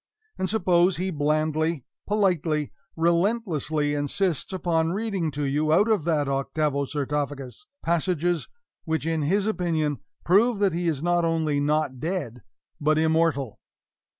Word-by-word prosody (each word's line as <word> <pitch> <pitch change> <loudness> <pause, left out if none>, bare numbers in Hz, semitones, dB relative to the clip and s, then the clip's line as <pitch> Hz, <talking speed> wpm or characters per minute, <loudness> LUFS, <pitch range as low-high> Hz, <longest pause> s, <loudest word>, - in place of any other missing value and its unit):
and 185 - -2
suppose 180 -4 +3
he 185 +2 -2
blandly, 155 -1 0 0.2
politely, 175 -8 +1 0.2
relentlessly 170 -4 +1
insists 145 +5 -1
upon 170 -3 0
reading 200 -5 -1
to 145 0 -4
you, 150 +3 +1
out 200 +7 +4
of 210 -8 +1
that 155 -4 +1
octavo 140 +1 0
sarcophagus, 145 - -4 0.2
passages 170 0 0 0.4
which 160 -1 -2
in 165 -1 0
his 195 +7 +1
opinion 165 -8 0 0.3
prove 215 +6 +4
that 195 -3 +2
he 175 +1 -1
is 155 -3 -1
not 175 0 +2
only 160 -3 +1
not 145 -2 0
dead, 150 -8 -3 0.4
but 155 0 +2
immortal? 160 -6 +1
160 Hz, 130 wpm, -25 LUFS, 150-180 Hz, 0.4 s, out